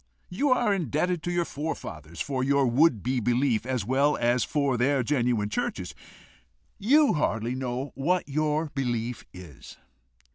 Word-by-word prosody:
You 275 +11 0
are 240 -5 +3
indebted 175 - -1
to 175 - -3
your 175 -1 0
forefathers 85 - -6
for 130 -2 -2
your 140 0 +3
would 125 - +3
be 125 +1 0
belief, 120 0 +1
as 125 -6 -1
well 140 +5 +2
as 120 +1 +2
for 140 -3 0
their 130 +2 +2
genuine 120 -6 0
churches. - - -3 0.9
You 285 +8 +4
hardly 120 -6 -1
know 130 +1 -4
what 170 +6 0
your 155 +2 0
belief 120 -3 -2
is. 90 -6 -12
135 Hz, 145 wpm, -27 LUFS, 120-155 Hz, 0.9 s, You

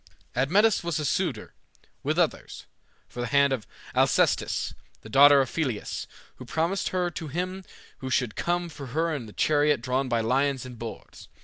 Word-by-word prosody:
Admetus 190 - +3
was 170 -2 -1
a 150 - -2
suitor, 140 - -1 0.5
with - - -1
others, - - -1 0.4
for 120 - -7
the 120 - -2
hand 140 +1 +4
of 120 -5 -4 0.3
Alcestis, - - +2 0.3
the 110 - -12
daughter 140 +4 +7
of 130 - -3
Pelias, 130 -10 -2 0.3
who - - -9
promised 165 +9 -1
her 180 -1 -1
to 160 -1 -6
him 185 +5 -3 0.4
who 130 - -5
should 125 -4 0
come 175 0 -1
for 145 -4 -9
her 165 0 +1
in 120 -7 -5
a - - -11
chariot 150 +2 +2
drawn 130 +2 -1
by 120 - +1
lions 130 +3 +1
and 125 -2 -10
boars. 115 -1 -9
140 Hz, 175 wpm, -26 LUFS, 125-170 Hz, 0.5 s, daughter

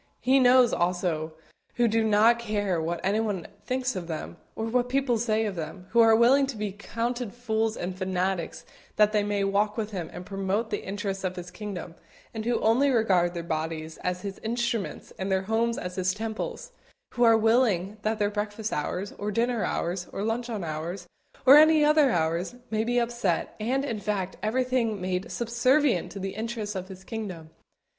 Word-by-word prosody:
He 265 +2 +4
knows, 250 -1 +6
also, 175 -3 -1 0.4
who 240 -1 +3
do 225 0 +2
not 220 +2 +4
care 205 -6 -1
what 170 +1 -2
anybody 205 -2 0 0.2
thinks 255 -1 -1
of 180 -3 -5
them, 165 +1 -5 0.2
or 220 - -3
what 245 +2 0
people 260 -3 +1
say 220 -1 +1
of 205 -3 -3
them; 180 +2 -6
who 235 - +3
are 225 -1 +7
willing 265 +4 +5
to 265 -4 -5
be 210 -1 -2
counted 230 +3 -4
fools 225 -2 -1
and 180 +1 -4
fanatics 185 -1 -2 0.3
that 210 0 +4
they 210 -1 +2
may 205 -1 0
walk 205 +2 +1
with 215 -1 -2
Him 180 -5 -4
and 180 - -8
promote 195 +4 -2
the 205 - -2
interests 195 -1 -4
of 185 -1 -2
His 180 0 -7
kingdom, 195 -5 -6 0.4
and 220 -1 -5
who 240 0 +1
only 245 +6 +4
regard 185 -8 +2
their 170 - -3
bodies 160 0 -4
as 180 0 -3
His 200 -1 -5
instruments 235 -1 -3
and 190 +1 -2
their 190 0 +1
homes 230 +3 0
as 180 +1 -5
His 185 0 +1
temples; 225 - -5 0.4
who 240 - -4
are 230 -2 +7
willing 220 -4 +2
that 215 +1 0
their 205 -1 +1
breakfast 210 +1 -3
hours, 180 +6 -3
or 205 - -2
dinner 230 +1 0
hours, 175 0 -2
or 195 - -4
luncheon 225 -2 -2
hours, 165 +3 -4 0.4
or 270 +2 +10
any 310 0 +6
other 300 -2 +5
hours 170 +2 0 0.2
may 220 0 +1
be 240 +2 0
upset, 235 -7 0
and, 260 +6 0
in 230 -6 -3
fact, 195 -2 -2
everything 240 -1 0
made 180 0 -3
subservient 240 - +2
to - - -8
the 195 0 -4
interests 220 -1 -4
of 185 -1 -5
His 190 -1 -11
kingdom. 185 -8 -6
210 Hz, 185 wpm, -27 LUFS, 185-235 Hz, 0.4 s, or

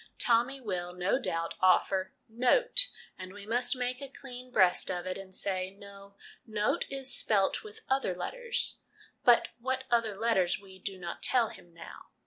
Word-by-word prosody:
Tommy 240 +3 +3
will, 180 -7 -4
no 180 +8 0
doubt, 165 -9 -2
offer 190 +3 +2
' 260 - -46
note/ - - +4 0.3
and 185 0 -8
we 205 0 -11
must 245 +4 0
make 250 +1 -3
a 275 - -7
clean 255 -2 -10
breast 185 -7 +3
of 180 -1 -3
it 185 - -3
and 190 -1 -10
say, 185 -1 -2
c 195 - -20
No, 200 0 -14 0.3
note 215 -2 -1
is 270 -1 0
spelt 200 -3 +2
with 435 +1 -12
other 265 -9 0
letters 480 - 0 0.2
'; - - -28
but 240 -1 +5
what 260 +2 -2
other 225 -4 +1
letters 200 -6 +1
we 190 -1 -15
do 195 +1 -5
not 175 -2 -7
tell 240 -4 +3
him 175 -2 -15
now. 165 0 -12
215 Hz, 180 wpm, -30 LUFS, 185-255 Hz, 0.3 s, but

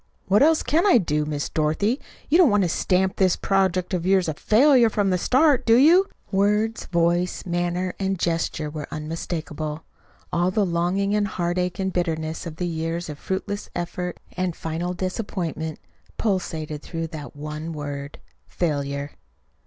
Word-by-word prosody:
"What 200 +4 +3
else 315 +2 +4
can 325 +4 +2
I 375 - +7
do? 150 -7 0
Miss 150 -1 -2
Dorothy, 160 - 0 0.3
you 325 +5 +4
don't 345 -7 +7
want 205 -2 +3
to 175 - +1
stamp 185 +2 +1
this 185 -2 +3
project 190 -2 +1
of 175 -2 0
yours 190 -1 +3
a 155 - -1
FAILURE 240 - +5
from 205 -3 +1
the 180 - +2
start, 270 - +3
do 230 - +5
you?" 335 +10 +6 0.2
Words, 210 +3 +1
voice, 175 +1 +1
manner, 175 +1 -1
and 195 0 0
gesture 165 -2 -1
were 150 -1 -6
unmistakable. 155 0 -4 0.5
All 175 +1 +2
the 200 +2 +1
longing 180 +3 0
and 210 -1 +2
heartache 180 -1 -1
and 190 -1 -2
bitterness 160 -2 -2
of 160 -1 -9
years 165 -1 -2
of 150 -1 -7
fruitless 195 +2 -4
effort 175 0 -4 0.2
and 180 -2 -1
final 165 +3 -3
disappointment 175 -4 -3 0.4
pulsated 160 -7 -2
through 165 +1 -4
that 155 -3 -8
one 150 +2 -5
word 145 -2 -6 0.3
FAILURE. 140 -3 -2
175 Hz, 155 wpm, -24 LUFS, 160-195 Hz, 0.5 s, I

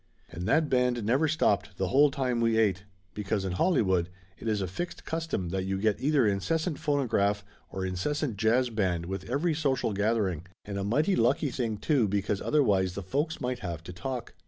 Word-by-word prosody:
And 85 +3 -5
that 155 +6 +3
band 125 -3 +1
never 130 +9 +2
stopped 105 -10 +1
the 95 -1 -1
whole 145 +2 +5
time 130 -3 -1
we 115 -1 +2
ate, 100 -4 +2 0.3
because 105 -1 -2
in 95 - -2
Hollywood 95 - +2 0.3
it - - -7
is 110 -2 +1
a 95 - -1
fixed 170 - -5
custom 160 - -2
that 95 +1 -2
you 95 0 -1
get 105 +1 0
either 140 -3 +3
incessant 155 - 0
phonograph 110 -8 +1 0.2
or 95 0 -4
incessant 120 - -2
jazz 120 +3 +2
band 90 -6 0
with 95 +1 -5
every 150 +6 +1
social 140 -7 0
gathering, 100 -5 0 0.2
and 100 -1 -4
a - - -2
mighty 150 - +2
lucky 145 -6 +2
thing, 115 -3 -2
too, 125 +1 +2
because 100 0 -1
otherwise 100 -11 +2
the 100 - -4
folks 145 - -1
might 125 0 -2
have 85 -5 -5
to 90 - -8
talk. 125 +8 -5
110 Hz, 190 wpm, -28 LUFS, 95-140 Hz, 0.3 s, whole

